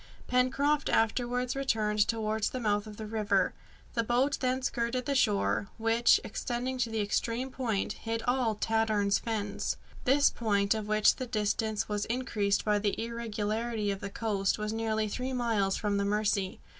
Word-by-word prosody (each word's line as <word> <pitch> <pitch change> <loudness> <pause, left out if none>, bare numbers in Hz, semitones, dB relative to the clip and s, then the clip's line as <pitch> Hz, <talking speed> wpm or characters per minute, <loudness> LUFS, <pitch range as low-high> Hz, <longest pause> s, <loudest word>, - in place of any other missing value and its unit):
Pencroft 275 +4 +2
afterwards 245 +2 +1
returned 215 -6 +1
towards 220 -1 0
the 255 - -4
mouth 210 -2 0
of 210 -1 -9
the 220 - -6
river. 215 0 +1 0.4
The 230 - +1
boat 250 +5 +1
then 255 0 0
skirted 245 -1 -1
the 280 - 0
shore, 210 -5 +2
which, 230 +1 +4
extending 245 +4 -3
to 235 - +1
the 225 -1 -1
extreme 230 +5 -1
point, 225 -6 -1
hid 225 0 -4
all 245 -3 +1
Tadorn's 215 -2 +1
Fens. 210 -3 -2 0.3
This 280 +2 +5
point, 205 -3 +1
of 215 -1 -4
which 215 0 +4
the 255 - -4
distance 215 -1 -1
was 210 -1 -1
increased 220 -5 0
by 210 -1 +3
the 205 -1 -1
irregularity 225 -1 -2
of 195 - -4
the 200 - -5
coast, 200 -3 0
was 210 0 -3
nearly 220 -1 0
three 255 +5 -3
miles 225 -6 +1
from 205 -1 0
the 200 - 0
Mercy. 205 -2 0
225 Hz, 165 wpm, -30 LUFS, 210-245 Hz, 0.4 s, This